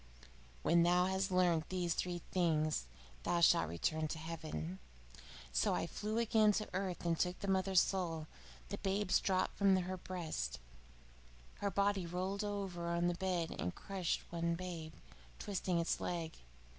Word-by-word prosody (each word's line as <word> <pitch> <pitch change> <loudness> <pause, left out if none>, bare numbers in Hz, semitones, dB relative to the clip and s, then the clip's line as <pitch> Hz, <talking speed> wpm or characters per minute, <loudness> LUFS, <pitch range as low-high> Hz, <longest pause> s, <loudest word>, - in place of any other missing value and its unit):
When 170 +1 +5
thou 180 +1 +4
has 190 +1 0
learnt 175 -3 +2
these 180 -2 0
things, 170 - 0 0.3
thou 170 - +1
shalt 85 - +5
return 155 - 0
to 155 - -4
heaven.' 155 - -5 0.7
So - - +2
I - - 0
flew 210 +5 -3
again 220 -2 +4
to 215 - -1
earth 185 -2 -2
and 165 -1 +1
took 180 0 +1
the 200 - -5
mother's 190 -1 +4
soul. 165 -5 -1 0.4
The 200 - -4
babes 195 0 +2
dropped 185 -1 0
from 195 -1 +6
her 185 0 -1
breasts. 175 - -3 1.0
Her 200 - 0
body 200 -1 +1
rolled 185 +4 -2
over 195 -4 -3
on 170 +1 +2
the - - +1
bed 175 -2 -1
and 90 - -2
crushed 190 -3 -2
one 170 0 0
babe, 170 -3 -6 0.4
twisting 185 -3 -1
its 170 0 +1
leg. 165 -2 -2
180 Hz, 150 wpm, -36 LUFS, 165-190 Hz, 1.0 s, from